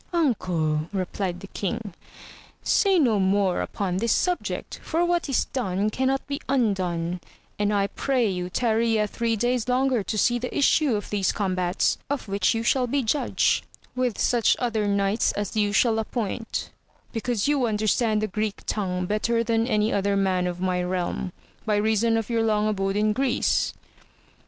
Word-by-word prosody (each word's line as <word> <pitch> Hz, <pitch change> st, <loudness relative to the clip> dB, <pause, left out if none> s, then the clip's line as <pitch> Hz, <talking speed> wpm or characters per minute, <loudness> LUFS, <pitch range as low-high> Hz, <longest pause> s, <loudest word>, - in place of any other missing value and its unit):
Uncle, 175 Hz, -, 0 dB
replied 185 Hz, -1 st, -3 dB
the 195 Hz, -, -8 dB
king, 205 Hz, 0 st, -4 dB, 0.7 s
say 390 Hz, -3 st, +3 dB
no 240 Hz, -10 st, +3 dB
more 190 Hz, -1 st, +2 dB
upon 185 Hz, -3 st, -2 dB
this 230 Hz, +3 st, 0 dB
subject, 360 Hz, -1 st, -1 dB
for 335 Hz, +2 st, 0 dB
what 345 Hz, -3 st, 0 dB
is 270 Hz, -, +1 dB
done 210 Hz, -5 st, 0 dB
cannot 265 Hz, +3 st, 0 dB
be 280 Hz, 0 st, -4 dB
undone, 180 Hz, -9 st, 0 dB, 0.4 s
and 205 Hz, 0 st, +1 dB
I 200 Hz, -1 st, +2 dB
pray 250 Hz, +3 st, 0 dB
yon 180 Hz, -2 st, -3 dB
tarry 230 Hz, +2 st, +1 dB
yet 210 Hz, -2 st, +1 dB
three 230 Hz, -1 st, 0 dB
days 240 Hz, +2 st, 0 dB
longer 255 Hz, -1 st, +2 dB
to 215 Hz, +2 st, -3 dB
see 240 Hz, +3 st, +2 dB
the 250 Hz, -, -4 dB
issue 285 Hz, -2 st, +3 dB
of 205 Hz, -, -5 dB
these 200 Hz, -3 st, +1 dB
combtirt^ 185 Hz, -3 st, 0 dB
of 285 Hz, -5 st, -3 dB
which 200 Hz, +2 st, +1 dB
you 225 Hz, -, -1 dB
shall 250 Hz, +1 st, +2 dB
be 275 Hz, +2 st, 0 dB
judge, 260 Hz, +6 st, +1 dB, 0.3 s
with 250 Hz, -3 st, 0 dB
such 240 Hz, -2 st, +3 dB
other 225 Hz, -4 st, -1 dB
knights 200 Hz, +2 st, +1 dB
as 205 Hz, 0 st, -4 dB
you 205 Hz, -1 st, +2 dB
shall 225 Hz, +2 st, +3 dB
appoint, 225 Hz, 0 st, -3 dB, 0.4 s
because 230 Hz, -1 st, -1 dB
you 285 Hz, -4 st, +2 dB
understand 215 Hz, 0 st, +1 dB
the -, -, +1 dB
Greek 215 Hz, +1 st, -3 dB
tongue 180 Hz, -3 st, -2 dB
better 230 Hz, +4 st, 0 dB
than 230 Hz, 0 st, +1 dB
any^other 200 Hz, -2 st, +1 dB
man 185 Hz, -2 st, +1 dB
of 175 Hz, 0 st, -4 dB
my 180 Hz, -1 st, 0 dB
realm, 180 Hz, 0 st, -2 dB, 0.3 s
by 215 Hz, -2 st, +1 dB
reason 220 Hz, +2 st, +2 dB
of 225 Hz, -2 st, -2 dB
your 230 Hz, -1 st, 0 dB
long 215 Hz, -1 st, +2 dB
abode 195 Hz, -2 st, -1 dB
in 210 Hz, +1 st, +2 dB
Greece. 260 Hz, +1 st, +1 dB
215 Hz, 165 wpm, -25 LUFS, 195-240 Hz, 0.7 s, say